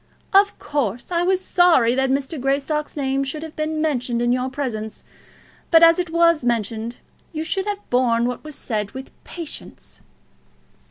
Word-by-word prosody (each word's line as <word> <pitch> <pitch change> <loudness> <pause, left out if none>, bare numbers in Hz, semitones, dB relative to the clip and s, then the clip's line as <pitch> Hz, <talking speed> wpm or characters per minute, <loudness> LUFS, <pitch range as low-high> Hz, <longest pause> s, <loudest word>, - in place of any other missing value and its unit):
Of 400 +1 +4
course, 250 - -3
I 340 -1 +1
was 370 +1 +1
sorry 330 -10 +4
that 265 +1 +1
Mr. 275 +2 -2
Greystock's 285 +3 -1
name 270 -1 0
should 300 +3 -5
have 320 -1 -9
been 310 0 -2
mentioned 250 -6 -1
in 240 0 +1
your 255 +1 -1
presence; 235 -6 -5 0.7
but 330 -1 +6
as 330 +1 +7
it 355 -2 -1
was 335 -3 +3
mentioned, 230 0 -1 0.4
you 310 0 -3
should 385 +4 -2
have 410 0 -4
borne 240 -2 +2
what 245 0 -3
was 305 -1 -9
said 210 -4 -3
with 265 0 -8
patience." 335 -4 -9
275 Hz, 165 wpm, -22 LUFS, 245-325 Hz, 0.7 s, as